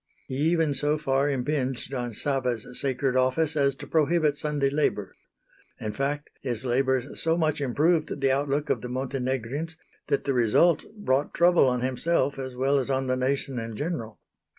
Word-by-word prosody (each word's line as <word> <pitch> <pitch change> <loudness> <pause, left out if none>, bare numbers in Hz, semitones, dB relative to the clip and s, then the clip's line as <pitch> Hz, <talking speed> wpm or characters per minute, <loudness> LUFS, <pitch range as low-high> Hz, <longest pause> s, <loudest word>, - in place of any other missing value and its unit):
He 130 - -4
even 165 -4 +2
so 145 +2 +1
far 140 -1 +1
impinged 135 -1 -2
on 120 -3 -3
Sava's 125 -5 -1
sacred 130 0 +1
office 140 +5 +2
as 140 -2 +2
to - - -9
prohibit 155 -1 +2
Sunday 145 -2 0
labour. 135 -9 -1 0.6
In 105 -1 -4
fact 145 +2 -2
his 125 -2 -3
labours 130 +1 0
so 165 +1 +2
much 155 -3 0
improved 150 +4 +1
the 135 -1 +2
outlook 140 +2 0
of - - 0
the 125 - -6
Montenegrins 135 +4 -3 0.3
that 140 - 0
the 140 - 0
result 130 +7 +3
brought 140 -8 0
trouble 175 -4 +5
on 125 -1 +1
himself 135 +2 0
as 130 -1 -5
well 135 +2 +2
as 130 - -3
on 135 0 0
the 130 0 +1
nation 130 0 -1
in 115 -1 -6
general. 120 -7 -4
135 Hz, 170 wpm, -26 LUFS, 130-150 Hz, 0.6 s, trouble